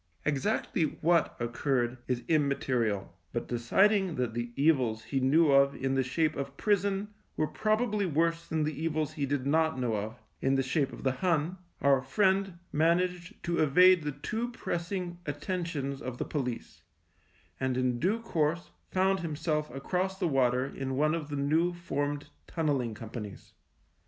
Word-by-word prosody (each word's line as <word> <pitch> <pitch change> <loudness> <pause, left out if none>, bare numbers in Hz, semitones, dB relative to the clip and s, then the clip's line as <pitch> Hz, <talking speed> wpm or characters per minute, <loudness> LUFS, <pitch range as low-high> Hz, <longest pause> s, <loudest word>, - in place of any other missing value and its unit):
Exactly 155 +1 0
what 170 +1 +2
occurred 120 +1 -1
is 125 -2 -1
im 155 -3 +3
material, 115 -7 -1 0.2
but - - -2
deciding 190 - +2
that 125 -3 -1
the 120 0 -3
evils 130 -7 +2
he 135 +4 -1
knew 145 +4 +4
of 140 0 +5
in 135 0 -1
the 135 - +2
shape 155 +5 0
of 140 0 -5
prison 200 0 +1 0.3
were 155 - +2
probably 215 +2 0
worse 165 +1 0
than 160 -1 0
the 155 0 -3
evils 155 -2 -1
he 140 -2 -2
did 140 -1 -1
not 160 +2 +2
know 120 -3 0
of, 110 +3 -4 0.2
in 135 0 +2
the 135 - +2
shape 135 +1 0
of - - -9
the 135 - +2
Hun, 165 +4 0 0.3
our 140 -2 +5
friend 190 +5 +1
managed 175 +3 0
to 170 0 -1
evade 180 +4 +6
the 150 -1 -2
too 220 - -3
pressing 175 -4 -4
attentions 145 -3 -3
of 125 -3 -5
the - - -2
police, 125 -6 -4 0.8
and 130 -1 0
in 125 -1 +1
due 205 - +1
course 170 -5 -1 0.2
found 190 +1 +2
himself 155 -2 -2
across 180 +9 -2
the 185 -3 0
water 130 -3 +2
in 135 -1 -4
one 155 +2 +3
of 160 -3 -3
the 145 - -3
new 155 +5 +2
formed 145 -4 -3 0.2
Tunnelling 140 -9 -1
Companies. 110 -2 -8
150 Hz, 160 wpm, -30 LUFS, 130-175 Hz, 0.8 s, evade